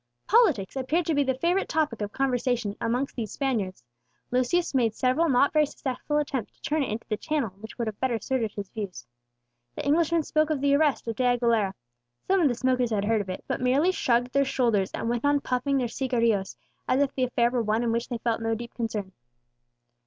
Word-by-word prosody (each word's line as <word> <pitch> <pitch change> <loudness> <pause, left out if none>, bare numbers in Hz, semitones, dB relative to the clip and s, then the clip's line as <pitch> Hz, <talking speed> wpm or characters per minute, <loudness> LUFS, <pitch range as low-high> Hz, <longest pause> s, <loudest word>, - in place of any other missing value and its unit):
Politics 325 - +3
appeared 300 +6 0
to 325 - +1
be 285 - +3
the 265 -1 0
favourite 350 +6 +1
topic 300 -9 0
of 205 0 -3
conversation 245 -5 0
amongst 245 +4 -1
these 220 -5 -4
Spaniards. 215 - -2 0.5
Lucius 255 +9 +1
made 230 -5 +2
several 260 +6 +2
not 270 +2 +3
very 305 -1 +4
successful 285 +2 -3
attempts 275 -6 -2
to - - -34
turn 310 0 0
it 275 - -1
into 220 +2 -5
the 215 - 0
channel 295 -8 -1
which 220 +1 -10
would 235 - -1
have 215 -2 -5
better 255 -3 0
suited 230 -1 -1
his 200 -2 -7
views. 205 -5 -6 0.7
The - - -5
Englishman 325 +2 +2
spoke 310 +1 +1
of 305 -3 0
the 280 +1 +2
arrest 290 -4 +2
of 230 - -3
De 255 - +1
Aguilera; 225 -5 +1 0.5
some 385 0 +3
of 315 - +5
the 245 - 0
smokers 255 -1 +1
had 205 -3 0
heard 220 0 +2
of 195 - -8
it, 185 - -5
but - - -2
merely 275 +8 +3
shrugged 245 -7 +1
their 280 - +4
shoulders 230 -8 +1
and - - -3
went 235 0 -1
on 285 0 +3
puffing 275 +1 0
their 250 -2 0
cigarillos, 230 -5 0 0.3
as 255 - +2
if 285 -1 +1
the 255 - +1
affair 240 -1 +1
were 245 -1 +1
one 220 +1 0
in 235 - +1
which 235 +1 -1
they 240 - -2
felt 230 0 -1
no 225 0 0
deep 235 +1 -8
concern. 215 -5 -3
250 Hz, 220 wpm, -26 LUFS, 225-285 Hz, 0.7 s, of